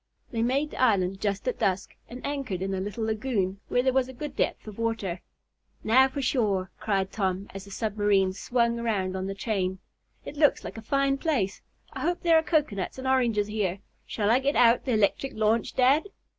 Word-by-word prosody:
They 230 - -1
made 275 +5 +1
the - - -5
island 195 -6 +2
just 200 +3 -2
at 250 - -1
dusk, 190 0 -1
and 250 +2 -8
anchored 270 -11 -3
in 195 0 -2
a 190 - -1
little 205 +3 -4
lagoon, 215 -4 -1
where 245 - +1
there 260 -1 +2
was 260 -1 +2
a - - -8
good 280 +2 -6
depth - - -1
of 215 0 -9
water. 215 -6 -2 0.6
"Now 260 +4 +5
for 275 +1 -4
shore!" 205 -8 0
cried 195 -3 0
Tom, 190 -1 -1
as 195 0 -7
the - - -13
submarine 200 -2 +1
swung 235 +3 0
around 200 -5 -1
on 190 0 -3
the 195 - -4
chain. 190 -3 -1 0.5
"It 295 - -8
looks 295 -1 +3
like - - -7
a - - -9
fine 275 +3 +1
place. 250 - -1 0.3
I - - -6
hope 350 +1 -1
there 330 -2 +6
are - - +1
cocoanuts 300 - -1
and 260 0 -5
oranges 240 -6 +2
here. 205 -3 -1 0.3
Shall 210 -1 0
I 245 - +5
get 280 +2 0
out 235 0 +5
the 255 - 0
electric 215 +5 +1
launch, 220 +1 +1
dad?" 265 +6 +4
225 Hz, 205 wpm, -27 LUFS, 195-260 Hz, 0.6 s, there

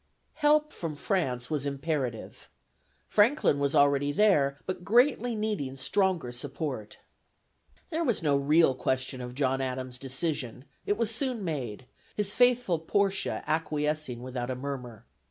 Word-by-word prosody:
Help 300 0 +3
from 165 -3 -4
France 140 - -1
was 145 -2 -1
imperative. 140 -4 -3 0.6
Franklin 210 - +3
was 140 0 0
already 145 0 +4
there, 145 -7 +3
but 185 -1 -4
greatly 245 +2 +3
needing 210 -12 -2
stronger 180 -2 0
support. 130 -3 -5 0.9
There 330 +1 0
was 235 - +1
no 145 -2 +3
real 145 +1 +4
question 130 0 -2
of 125 0 -7
John 135 -1 +1
Adams' 130 -1 -4
decision: 135 -2 -3 0.2
it 205 - +1
was 230 -1 0
soon 250 -3 -2
made, 130 - -4 0.3
his 205 -1 0
faithful 245 -8 +3
Portia 195 +4 0
acquiescing 150 -4 -1
without 125 -1 -4
a 130 - -1
murmur. 125 -4 -6
145 Hz, 135 wpm, -29 LUFS, 130-200 Hz, 0.9 s, already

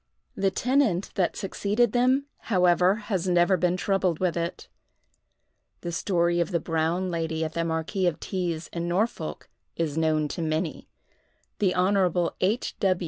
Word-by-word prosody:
The 195 0 +2
tenant 230 -3 +1
that 180 -3 0
succeeded 205 +3 0
them, 255 +3 +2 0.2
however, 180 -1 +4
has 205 -5 -3
never 175 +2 +4
been 180 0 +1
troubled 190 -3 +1
with 180 -1 0
it. 170 0 -3 1.1
The 175 - -4
story 170 -1 +1
of 170 - +1
the 175 -3 0
Brown 165 +3 -1
Lady 160 -1 -1
at 155 - -5
the 170 - -1
Marquis 165 +3 -1
of 170 - -1
T——'s, 175 -4 -3
in 170 0 -3
Norfolk, 200 +7 -2 0.3
is 160 -2 -1
known 155 -1 +2
to 170 - -4
many. 160 +1 -2 0.7
The 190 -3 +2
Hon. 180 -2 +2
H. 210 +7 0
180 Hz, 145 wpm, -26 LUFS, 165-195 Hz, 1.1 s, however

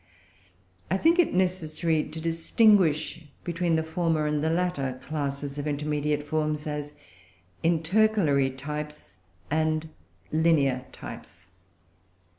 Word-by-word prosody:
I 190 - +2
think 330 - +3
it 350 - +4
necessary 170 -3 0
to 155 +2 -8
distinguish 165 -1 +3 0.2
between 170 -1 0
the 160 - +1
former 160 -1 0
and 150 -1 0
the 160 - +1
latter 160 -7 -1
classes 140 0 -3
of 145 - -3
intermediate 150 0 -1
forms, 155 0 -1
as 150 -1 -4 0.7
intercalary 165 -4 +3
types 150 +2 -7 0.3
and 155 0 0 0.4
linear 145 -6 +3
types. 85 +1 -10
155 Hz, 105 wpm, -27 LUFS, 145-170 Hz, 0.7 s, it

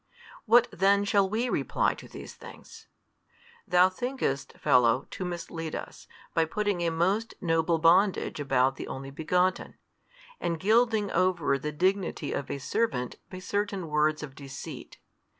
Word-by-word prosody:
What 240 +1 +5
then 200 +2 +3
shall 200 -1 +2
we 225 +4 0
reply - - 0
to - - -12
these - - -10
things? - - -13 0.8
Thou 180 +1 +5
thinkest, 190 - -3
fellow, 125 +1 +3
to - - -5
mislead 170 -2 -5
us, - - -8 0.3
by 165 - +3
putting 205 +1 -1
a 170 - +1
most 190 +7 0
noble 165 -1 +1
bondage 175 +2 +3
about 135 -2 +1
the - - -6
Only 135 +1 -7
Begotten, 180 +5 0 0.6
and 170 -1 -2
gilding 220 0 +2
over 170 -6 +1
the 150 +2 -4
dignity 185 +4 -1
of 140 - -4
a - - -3
servant 135 - -2
by 185 - -8
certain 195 -2 -3
words 150 0 +1
of 140 -3 -8
deceit. 135 -1 -9
175 Hz, 145 wpm, -28 LUFS, 150-200 Hz, 0.8 s, What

